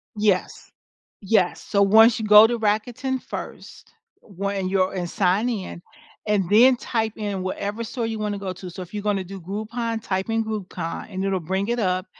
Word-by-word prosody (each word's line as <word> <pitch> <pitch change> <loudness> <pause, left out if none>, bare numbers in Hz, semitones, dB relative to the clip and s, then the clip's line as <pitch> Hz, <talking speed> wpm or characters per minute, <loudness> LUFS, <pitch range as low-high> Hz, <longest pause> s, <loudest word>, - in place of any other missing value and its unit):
Yes. 205 -3 -1 0.5
Yes, 190 -3 +1
so 200 -1 0
once 220 +3 +6
you 220 - -3
go 210 +1 +9
to 235 +1 0
Rakuten 235 +5 -1
first, - - -9 0.3
when 195 -1 -3
you're 190 -1 +1
and 175 -2 -3
sign 200 +4 +1
in, 195 -6 -5 0.5
and 205 -4 +1
then 245 +5 +6
type 225 -2 -2
in 205 -3 -3
whatever 205 +4 -3
store 230 +2 -4
you 225 -1 -3
wanna 210 -1 -2
go 195 -2 -4
to, 185 0 -9
so 185 +2 -8
if 180 - -16
you're 210 - -3
gonna 205 -2 0
do 190 +1 -9
Groupon 220 +5 -4
type 190 +2 -2
in 225 0 +1
Groupon 185 -6 -5
and 190 -1 -3
it'll 195 -1 0
bring 190 +5 -2
it 240 - 0
up 185 -3 0
205 Hz, 185 wpm, -23 LUFS, 190-225 Hz, 0.5 s, go